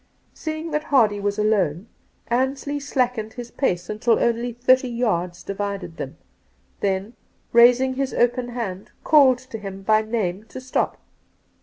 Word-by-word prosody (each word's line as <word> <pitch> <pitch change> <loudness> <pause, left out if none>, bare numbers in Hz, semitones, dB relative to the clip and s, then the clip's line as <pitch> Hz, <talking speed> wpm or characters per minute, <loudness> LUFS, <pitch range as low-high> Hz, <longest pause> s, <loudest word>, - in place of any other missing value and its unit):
Seeing 315 +1 -5
that 300 0 -1
Hardy 220 -7 +3
was 200 +1 -1
alone, 200 -4 +1 0.4
Ansley 270 +4 -1
slackened 250 -6 -1
his 240 -1 -8
pace 180 -10 -1
tUl 220 +2 +1
only 235 +1 0
thirty 255 +2 +3
yards 180 -8 -1
divided 195 -4 -4
them, - - -6 0.6
then, 195 +3 -1 0.4
raising 245 +2 +6
his 270 0 -2
open 245 0 +1
hand, 210 -6 -5
called 275 -5 +6
to 255 -3 -9
him 195 -1 -8
by 215 +2 +4
name 215 -3 -2
to 245 - -9
stop. 260 0 -1
235 Hz, 140 wpm, -23 LUFS, 200-255 Hz, 0.6 s, raising